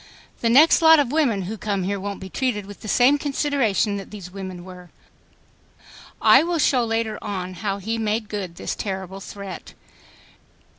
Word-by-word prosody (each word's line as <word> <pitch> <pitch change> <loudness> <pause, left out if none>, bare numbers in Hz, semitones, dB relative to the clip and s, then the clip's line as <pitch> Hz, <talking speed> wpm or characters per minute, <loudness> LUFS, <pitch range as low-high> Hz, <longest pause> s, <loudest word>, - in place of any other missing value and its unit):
The 230 - +1
next 295 +9 +6
lot 320 0 +8
of 280 -4 +1
women 260 -11 +1
who 210 +4 -6
come 200 -3 -2
here 200 +2 -2
won't 200 +1 -5
be 190 - -8
treated 210 -1 -2
with 205 0 -12
the - - -8
same 255 +7 +4
consideration 270 -8 0
that 195 - -8
these 195 -4 -9
women 185 -2 -7
were." 180 -1 -12 1.3
I 270 - +7
will 340 +1 -1
show 265 -5 +3
later 225 -1 -2
on 185 -3 -4
how 195 +2 -3
he 225 +4 -3
made 215 0 -1
good 195 -5 -5
this - - -4
terrible 190 -1 -5
threat. 195 -2 -9
210 Hz, 170 wpm, -23 LUFS, 190-245 Hz, 1.3 s, lot